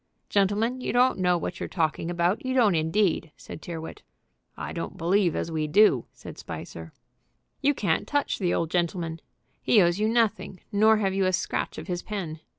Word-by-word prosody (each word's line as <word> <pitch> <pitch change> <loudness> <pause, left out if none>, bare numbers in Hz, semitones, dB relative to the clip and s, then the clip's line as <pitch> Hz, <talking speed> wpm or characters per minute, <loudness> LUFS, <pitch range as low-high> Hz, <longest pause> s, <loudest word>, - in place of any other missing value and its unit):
"Gentlemen, 210 +6 +1
you - - -2
don't 250 -2 +3
know 180 -1 +3
what 175 +1 -5
you're - - -4
talking 165 -1 -1
about, 175 +3 0
you 260 0 -2
don't 225 -7 +4
indeed," 165 0 +1
said - - -10
Tyrrwhit. 165 -2 -7 0.6
"I - - -5
don't - - -5
believe 175 +1 +2
as 165 - -3
we 155 -1 -1
do," 170 - +4
said - - -11
Spicer. 80 -1 -8 0.7
"You 285 +1 +2
can't 175 -9 0
touch 290 -1 -1
the 180 -3 0
old 165 -1 -1
gentleman. 170 -2 -1 0.4
He 220 - +4
owes 175 0 +3
you 215 +1 +2
nothing, 225 -5 0
nor 215 +2 +4
have 195 -3 0
you 195 0 +1
a 185 - 0
scratch - - -2
of - - -6
his 180 -2 -3
pen. 175 -7 -5
185 Hz, 185 wpm, -26 LUFS, 165-215 Hz, 0.7 s, don't